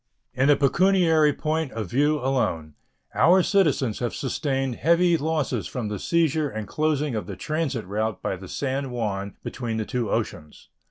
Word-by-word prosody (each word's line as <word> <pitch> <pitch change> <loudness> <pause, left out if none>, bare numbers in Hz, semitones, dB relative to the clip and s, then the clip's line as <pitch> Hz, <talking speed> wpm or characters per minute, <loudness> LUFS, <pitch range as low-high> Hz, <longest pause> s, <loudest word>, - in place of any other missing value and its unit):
In 135 +3 +2
a 145 - +7
pecuniary 160 +1 +3
point 155 -1 -2
of 110 -2 -3
view 145 +4 +2
alone 125 - -1 0.4
our 180 +2 +5
citizens 150 - +1
have 120 -2 -2
sustained 135 -2 -2
heavy 170 +1 +3
losses 155 -2 -1
from 120 -5 -4
the 105 -2 -4
seizure 160 - +1
and 110 -3 -6
closing 150 -1 0
of 110 - -3
the - - -6
transit 155 - -2
route 105 +2 -2
by - - -2
the 95 +1 -10
San 135 +5 -2
Juan 100 -5 -3
between 115 -3 -4
the 110 - -2
two 120 -2 -2
oceans. 75 0 -4
135 Hz, 165 wpm, -24 LUFS, 110-155 Hz, 0.4 s, a